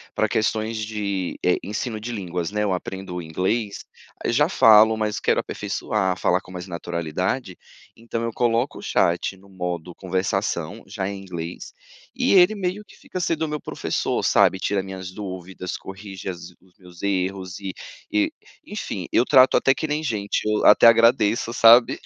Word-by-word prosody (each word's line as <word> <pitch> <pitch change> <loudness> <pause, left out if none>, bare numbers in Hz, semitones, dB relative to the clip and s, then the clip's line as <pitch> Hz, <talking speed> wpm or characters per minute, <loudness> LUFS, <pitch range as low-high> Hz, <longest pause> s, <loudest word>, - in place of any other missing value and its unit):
pra - - +1
questões 110 +1 0
de, 100 -4 -3
eh, 90 - +3
ensino 110 +2 -4
de 120 +3 -5
línguas, 90 -3 -3
né, 105 0 0
eu 100 - 0
aprendo 90 -1 -4
inglês, 95 +6 -2 0.4
aí - - 0
já 150 +6 +3
falo, 110 - +6
mas 110 -1 -2
quero - - +2
aperfeiçoar, 95 -4 -2
falar 90 0 +2
com 90 - -15
mais 90 +1 -7
naturalidade, 90 +5 -3 0.4
então 115 0 -4
eu 115 - -2
coloco 120 +4 0
o - - -10
chat 85 +3 +1
no 100 +1 -20
modo 90 -2 -5
conversação, 95 +1 -2
já 95 - -4
em 100 -1 -5
inglês 85 -2 -7 0.4
e - - +2
ele 190 +2 +6
meio 195 +1 -3
que - - -18
fica 185 - -7
sendo 165 -2 0
o - - -4
meu 150 0 -3
professor, - - -2
sabe, 95 - +4
tira 100 +1 -1
as 95 - -4
minhas 95 -1 -7
dúvidas, 95 -2 -6
corrige 95 -1 -8
as 90 0 -8
os 90 +1 -27
meus 90 -1 -15
erros 95 -1 -2
e 95 -2 -5 0.4
e 105 0 +1 0.3
enfim, - - -5
eu 120 - +3
trato 130 0 +6
até 135 - +4
que 155 - -3
nem 150 +1 -1
gente, 105 -8 -1
eu 105 0 +1
até 105 - +8
agradeço, 115 0 +4
sabe, 115 0 +6
100 Hz, 175 wpm, -23 LUFS, 90-115 Hz, 0.4 s, até